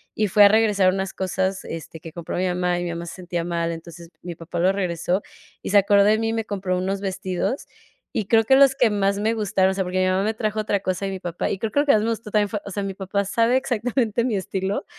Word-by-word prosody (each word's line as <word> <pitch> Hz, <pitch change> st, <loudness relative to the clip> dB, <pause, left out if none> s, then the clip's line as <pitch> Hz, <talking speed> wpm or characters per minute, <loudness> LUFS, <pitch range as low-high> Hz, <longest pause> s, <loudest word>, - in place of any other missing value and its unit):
y 215 Hz, -, +1 dB
fue 205 Hz, +3 st, +6 dB
a -, -, +10 dB
regresar 205 Hz, -3 st, +3 dB
unas 190 Hz, 0 st, -3 dB
cosas, 190 Hz, 0 st, -2 dB
este, 165 Hz, 0 st, -7 dB
que 165 Hz, 0 st, -10 dB
compró 170 Hz, -1 st, -5 dB
mi 185 Hz, +1 st, +1 dB
mamá 180 Hz, 0 st, 0 dB
y -, -, -3 dB
mi 175 Hz, -, -3 dB
mamá 170 Hz, 0 st, -5 dB
se 170 Hz, -, -7 dB
sentía 175 Hz, -2 st, -4 dB
mal. 170 Hz, -1 st, -1 dB
Entonces, 165 Hz, 0 st, -9 dB
mi 175 Hz, -, -5 dB
papá 170 Hz, +1 st, -8 dB
lo 185 Hz, +2 st, +4 dB
regresó 180 Hz, -1 st, -1 dB, 0.4 s
y -, -, -5 dB
se 205 Hz, -, +4 dB
acordó 200 Hz, 0 st, +5 dB
de 215 Hz, +1 st, +4 dB
mí 225 Hz, 0 st, -1 dB
y -, -, -1 dB
me 225 Hz, -1 st, -2 dB
compró 190 Hz, -3 st, -2 dB
unos 195 Hz, +2 st, -2 dB
vestidos 190 Hz, +5 st, -3 dB, 0.5 s
y 215 Hz, -, -1 dB
creo 225 Hz, +2 st, +3 dB
que 265 Hz, -, +5 dB
los 275 Hz, -1 st, +6 dB
que 250 Hz, -4 st, +3 dB
más 200 Hz, -1 st, 0 dB
me 220 Hz, +2 st, 0 dB
gustaron, 195 Hz, -3 st, +1 dB
o -, -, -2 dB
sea, 190 Hz, -, 0 dB
porque 185 Hz, 0 st, -2 dB
mi 185 Hz, -, +2 dB
mamá 185 Hz, +1 st, +1 dB
me 215 Hz, +2 st, 0 dB
trajo 215 Hz, -1 st, -2 dB
otra 205 Hz, -1 st, 0 dB
cosa 185 Hz, 0 st, -2 dB
y 195 Hz, -, -2 dB
mi 190 Hz, -, -5 dB
papá, 175 Hz, -2 st, -3 dB
y 195 Hz, -, -3 dB
creo 220 Hz, +1 st, -2 dB
que 285 Hz, -, +3 dB
lo -, -, -1 dB
que 285 Hz, -, +5 dB
más 215 Hz, -, +3 dB
me 225 Hz, -, 0 dB
gustó 220 Hz, -2 st, -4 dB
también 210 Hz, -1 st, +2 dB
fue, 210 Hz, -, -3 dB
o 200 Hz, -, -7 dB
sea, 200 Hz, -, -3 dB
mi 195 Hz, -1 st, -4 dB
papá 200 Hz, +1 st, -2 dB
sabe 230 Hz, +5 st, +2 dB
exactamente 240 Hz, -2 st, 0 dB
mi 240 Hz, -4 st, 0 dB
estilo. 190 Hz, +1 st, -3 dB
195 Hz, 280 wpm, -23 LUFS, 180-215 Hz, 0.5 s, a